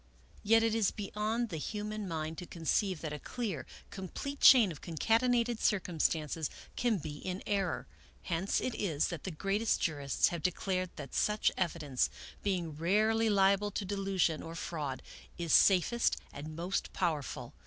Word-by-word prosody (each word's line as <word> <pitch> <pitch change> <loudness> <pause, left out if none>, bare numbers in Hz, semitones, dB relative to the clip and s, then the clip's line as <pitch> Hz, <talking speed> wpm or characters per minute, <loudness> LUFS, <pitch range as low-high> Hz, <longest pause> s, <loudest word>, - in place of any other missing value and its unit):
Yet 225 +2 +4
it 225 -1 +2
is 220 -3 +3
beyond 215 +3 -2
the 165 - -4
human 210 +4 -4
mind 160 -1 -3
to 180 - -7
conceive 180 +1 0
that 155 -2 -4
a 150 - -5
clear, 205 - -4 0.2
complete 200 - -6
chain 230 -8 +8
of 150 - -9
concatenated 230 +7 +1
circumstances 160 -5 0 0.3
can 235 -3 +1
be 150 -3 -6
in 185 +1 -4
error. 195 -4 -1 0.4
Hence 175 +3 0
it 255 - -2
is 160 -10 0
that 170 - -6
the - - -2
greatest 195 +6 0
jurists 145 -4 +1
have 170 -2 -4
declared 185 +1 -1
that - - -8
such 210 0 +2
evidence, 155 -7 0 0.3
being 180 -5 -1
rarely 215 +7 +2
liable 200 0 +3
to 205 0 -4
delusion 195 -4 0
or 165 0 -7
fraud, 150 -6 -4 0.3
is 170 -2 -1
safest 200 +5 +4 0.2
and 155 +2 -7
most 175 +4 -2
powerful. 160 -6 -2
185 Hz, 155 wpm, -32 LUFS, 165-210 Hz, 0.4 s, chain